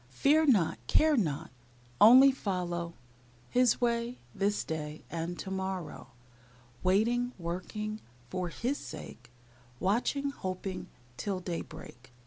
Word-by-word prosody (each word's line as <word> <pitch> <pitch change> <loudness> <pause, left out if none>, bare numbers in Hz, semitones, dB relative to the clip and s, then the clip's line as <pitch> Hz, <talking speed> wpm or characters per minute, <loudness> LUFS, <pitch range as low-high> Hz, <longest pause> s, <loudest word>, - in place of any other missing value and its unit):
Fear 295 - +3
not, 195 - +3
care 310 -1 +4
not, 160 - -1 0.5
Only 260 +5 +9
follow 175 -8 -3 0.6
His 250 -1 +4
way, 235 0 0 0.2
this 205 +1 0
day, 155 -1 -5
And 170 +1 -3
to 190 - -6
morrow. 190 -6 -4 0.7
Waiting, 235 +6 +2
working, 200 +5 -4 0.3
For 180 +5 -3
His 250 +10 -2
sake; 120 0 -9 0.5
Watching, 250 +8 +1
hoping, 185 -5 -5 0.3
Till 195 -3 -2
daybreak. 160 -8 -7
190 Hz, 110 wpm, -31 LUFS, 170-240 Hz, 0.7 s, Only